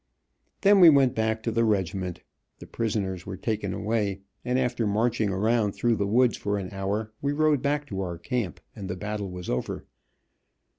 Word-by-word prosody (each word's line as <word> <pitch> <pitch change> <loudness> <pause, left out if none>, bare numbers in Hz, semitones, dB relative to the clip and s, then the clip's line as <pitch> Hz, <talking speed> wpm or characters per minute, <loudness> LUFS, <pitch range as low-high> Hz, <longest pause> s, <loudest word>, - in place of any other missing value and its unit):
Then 200 0 +6
we 175 -3 +10
went 135 -4 +5
back 110 0 -1
to 115 - -1
the 115 +1 +2
regiment, 95 -4 -1 0.3
the - - -11
prisoners 100 -6 -3
were 95 -2 -5
taken 105 -2 -2
away, 105 -2 -1 0.2
and 125 +1 0
after 125 -3 0
marching 110 +1 +1
around 105 +2 +1
through 120 -2 +1
the 100 - 0
woods 120 +3 +3
for 105 0 -1
an 95 -2 -5
hour 105 +3 -2
we 140 0 0
rode 150 -2 +2
back 145 +1 0
to 95 -3 -3
our 90 -3 -4
camp, 105 - -3 0.2
and 100 -2 -7
the 90 - -2
battle 105 0 -4
was 90 -1 -7
over. 65 - -3
110 Hz, 185 wpm, -26 LUFS, 95-120 Hz, 0.3 s, we